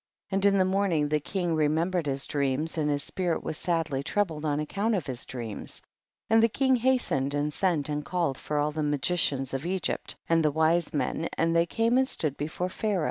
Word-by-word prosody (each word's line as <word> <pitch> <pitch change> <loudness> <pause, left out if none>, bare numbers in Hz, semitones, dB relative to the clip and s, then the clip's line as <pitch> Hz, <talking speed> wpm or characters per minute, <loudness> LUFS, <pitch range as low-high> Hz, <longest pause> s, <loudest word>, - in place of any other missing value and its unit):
6. - - -9
And 195 +1 +2
in 200 0 +4
the 185 - +4
morning 185 -6 +1
the 150 0 +2
king 175 +2 -2
remembered 160 +2 +1
his 135 0 0
dreams, 140 +2 -1
and 150 -2 0
his 145 -1 0
spirit 180 -3 -2
was 155 - -3
sadly 165 -5 0
troubled 160 -1 -1
on 145 -1 0
account 200 +9 0
of 185 - -2
his 125 -3 -5
dreams, 115 -5 -6 0.5
and 225 0 +5
the 230 - +4
king 265 +3 +2
hastened 235 - +1
and 145 +1 -1
sent 170 -6 +1
and 150 0 -2
called 170 -5 -1
for 150 - -3
all 145 +1 +1
the 155 +1 -3
magi 145 +3 +1
cians 135 -6 0
of 135 +1 -2
Egypt, 185 +1 -2
and 165 -1 +3
the 155 - +4
wise 160 +2 +2
men, 160 +2 -1
and 165 0 +2
they 170 0 +3
came 230 +6 +2
and 265 - +2
stood 155 - -2
before 160 +5 -3
Pha 200 +4 -4
raoh. 200 -3 +1
160 Hz, 220 wpm, -28 LUFS, 145-185 Hz, 0.5 s, and